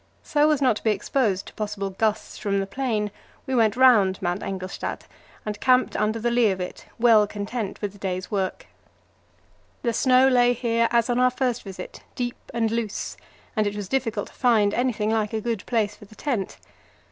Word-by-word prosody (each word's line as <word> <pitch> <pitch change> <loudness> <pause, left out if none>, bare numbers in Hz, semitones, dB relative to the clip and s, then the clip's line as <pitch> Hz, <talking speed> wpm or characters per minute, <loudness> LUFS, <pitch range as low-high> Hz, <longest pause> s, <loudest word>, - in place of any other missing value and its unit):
So 300 +1 +3
as 295 -2 +2
not 245 -5 +3
to - - -11
be 225 - +2
exposed 210 -2 0
to - - -12
possible 205 -2 -3
gusts 215 +2 -1
from 200 -1 0
the 195 - -1
plain, 215 -2 -2 0.3
we 265 - -3
went 225 -4 +3
round 215 -8 +5
Mount 175 +1 -2
Engelstad 190 -1 -4 0.4
and 210 -1 -4
camped 255 -1 +3
under 215 +1 +1
the 240 +2 0
lee 235 -2 +4
of 190 -1 -2
it, 180 - -6
well 225 -3 +5
content 205 +1 -4
with 205 - -1
the 205 - -16
day's 185 -1 -3
work. 195 -3 -2 1.2
The 235 -2 +1
snow 255 +2 +5
lay 245 -2 +4
here 230 -1 +1
as 235 -1 +2
on 245 0 +1
our 255 0 +5
first 250 -1 -1
visit, 195 -2 -9
deep 245 -1 -3
and 225 -2 0
loose, 230 -3 -3 0.4
and 215 -2 +2
it 205 - -3
was 205 -2 -5
difficult 230 -4 -1
to - - -20
find 220 -5 +3
anything 230 -4 0
like 220 -1 0
a 220 - 0
good 225 -3 -2
place 215 -4 0
for - - -14
the 215 - -17
tent. 235 -9 -3
220 Hz, 195 wpm, -24 LUFS, 205-245 Hz, 1.2 s, round